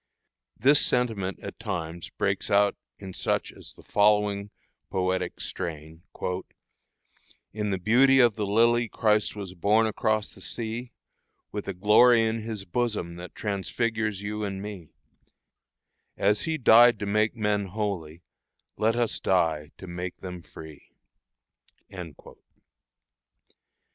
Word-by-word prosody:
This 140 +6 +5
sentiment 110 -6 0
at - - -8
times 85 -6 -5
breaks 100 0 -2
out 100 0 +3 0.2
in 95 -2 -9
such - - -1
as - - -11
the - - -17
following 105 -1 +2 0.4
poetic 95 0 -1
strain: 80 -2 -6 1.5
"In 105 0 -2
the 95 - 0
beauty 125 +8 +4
of 120 -3 +5
the 105 -2 -2
lily 115 +3 +3
Christ 110 -1 +1
was 100 -3 -7
born 105 +5 +3
across 110 -1 0
the - - -12
sea, 115 +1 -5 0.6
With 105 -1 -5
a 100 - -3
glory 115 +5 +5
in 110 0 -1
His 110 -3 -5
bosom 105 -5 -2
that 90 +1 -10
transfigures 105 +2 -2
you 105 +1 -3
and 100 -2 -3
me 100 -5 -8 1.3
As 105 +1 +2
He 160 -1 -1
died 120 -2 +7
to 105 - -4
make 105 +3 +1
men 105 -3 0
holy, 90 -5 -4 0.5
let 110 +2 +2
us 120 -2 0
die 80 -5 +1
to - - -10
make 90 0 -6
them 90 -2 -8
free." 80 -1 -13
105 Hz, 125 wpm, -26 LUFS, 95-110 Hz, 1.5 s, died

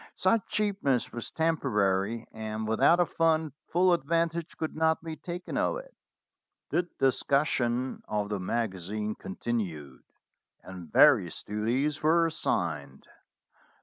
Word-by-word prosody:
Such 205 +3 +2
cheapness 195 - 0
was 120 - -5
temporary, 115 -9 0
and 110 0 -4
without 110 +10 +4
a 175 - +5
fund 160 -3 +1
full 180 +1 +3
advantage 165 +1 -1
could 160 - -3
not 160 0 +1
be 160 -1 -5
taken 175 +2 -6
of - - +1
it. - - -11 0.8
The 175 0 0
discussion 130 -2 +1
of 105 -1 -2
the 105 -2 -2
magazine 105 +1 -2
continued, 90 - -4 0.6
and 90 -4 -10
vari - - +6
ous - - -8
duties 120 +8 -1
were 165 +2 +4
assigned. 80 - -2
130 Hz, 120 wpm, -29 LUFS, 105-165 Hz, 0.8 s, vari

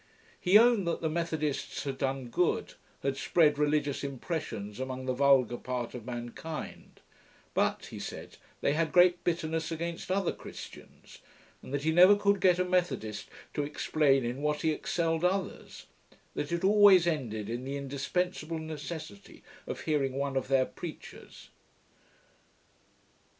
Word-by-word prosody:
He 190 +3 +6
owned 230 -5 +4
that 170 - -1
the 160 - -1
Methodists 160 -3 -2
had 135 -2 -4
done 135 -2 -2
good; 175 +9 0 0.3
had 135 -1 -1
spread 150 0 +3
religious 145 -1 +1
impressions 130 - -4
among 130 0 -4
the 130 - 0
vulgar 130 -3 +4
part 125 -1 -4
of 120 -2 -8
mankind: 120 +6 -7 0.5
but, - - 0
he - - -7
said, - - -8 0.2
they 140 - +2
had 160 +1 0
great 180 -1 +5
bitterness 165 -1 -1
against 170 +2 -4
other 190 -1 +1
Christians, - - -11 0.4
and - - -11
that 145 0 -2
he 160 - +2
never 180 +5 +8
could 200 -1 +2
get 180 -2 +5
a 180 - +1
Methodist 130 - -1 0.2
to - - -1
explain 145 -2 +1
in 125 +4 -3
what 150 +1 -1
he 160 - +3
excelled 165 +1 -1
others; 185 +1 -2 0.5
that 145 - -4
it 170 +1 -1
always 200 -3 +7
ended 120 -11 -2
in 120 +3 -4
the 135 +2 -4
indispensible 155 +4 -2
necessity 155 -8 -8 0.2
of - - -5
hearing 145 -4 0
one 140 0 -2
of 130 - -1
their 135 -1 +3
preachers. 165 +3 -10
150 Hz, 145 wpm, -30 LUFS, 135-170 Hz, 0.5 s, never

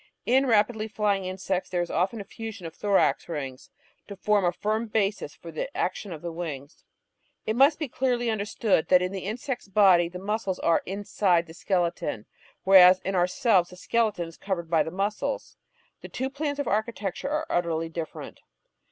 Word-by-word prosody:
In 265 +2 +3
rapidly 220 -1 +2
flying 205 -3 0
insects 185 0 -3
there 175 -1 0
is 175 - -7
often 190 +7 0
a - - -5
fusion 220 -2 -8
of 165 - -7
thorax 200 -2 +1
rings 135 -5 -6 0.4
to 200 - -8
form 205 +1 +1
a 175 - +3
firm 215 +5 -2
basis 205 -7 -1
for 165 - -10
the 160 - -4
action 190 +2 -2
of 160 -1 -8
the 170 - -4
wings. 155 -4 -7 0.6
It 220 - -1
must 275 +5 +5
be 305 - -3
clearly 245 -1 0
understood 210 -3 0
that 180 -1 +5
in 180 - -2
the 190 -2 -5
insect's 245 +2 -4
body 185 -4 +5
the 180 - -8
muscles 200 0 -2
are 170 - +2
inside 190 -3 +1
the 160 - -12
skeleton, 170 - -1 0.4
whereas 185 -1 +8
in 195 - -3
ourselves 185 +1 +2
the 180 - -12
skeleton 210 -3 0
is 165 - -13
covered 175 -4 -4
by 165 -2 +4
the - - -1
muscles. 205 - -3 0.5
The - - -9
two 265 +1 -3
plans 285 0 -3
of 285 - -2
architectiu'e 215 +1 -2
are 305 +1 -1
utterly 165 -2 0
different. 165 -1 -7
195 Hz, 180 wpm, -26 LUFS, 175-220 Hz, 0.6 s, whereas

